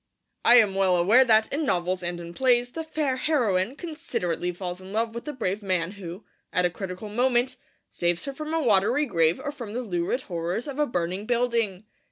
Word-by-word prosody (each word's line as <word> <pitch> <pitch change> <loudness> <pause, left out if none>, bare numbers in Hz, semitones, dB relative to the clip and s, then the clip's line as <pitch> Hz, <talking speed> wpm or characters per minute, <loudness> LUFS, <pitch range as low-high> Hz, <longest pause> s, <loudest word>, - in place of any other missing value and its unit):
I 240 - +7
am 215 -5 +6
well 190 -2 +3
aware 205 +9 +5
that, 220 -3 +3
in 305 +3 0
novels 180 -6 0
and 175 0 -3
in 170 0 -8
plays, 245 +1 +2
the 325 - -4
fair 305 -4 -1
heroine 240 -7 +1
considerately 180 - -3
falls 180 0 -6
in 190 +1 -10
love 225 +2 -1
with 235 - -6
the 300 - -3
brave 215 -6 -2
man 185 -3 -1
who, 190 -1 -9 0.3
at 180 - +3
a 175 - +1
critical 185 +2 -6
moment, 245 +3 +1 0.4
saves 175 0 -1
her 275 - -4
from 305 +2 -6
a 325 -1 +1
watery 230 +6 +3
grave 165 - +2
or 290 - -4
from 235 -8 -8
the 250 +2 -2
lurid 180 +4 -1
horrors 175 +5 -3
of 285 0 -5
a 295 - +3
burning 185 0 -2
building. 230 -5 0
215 Hz, 205 wpm, -26 LUFS, 180-255 Hz, 0.4 s, I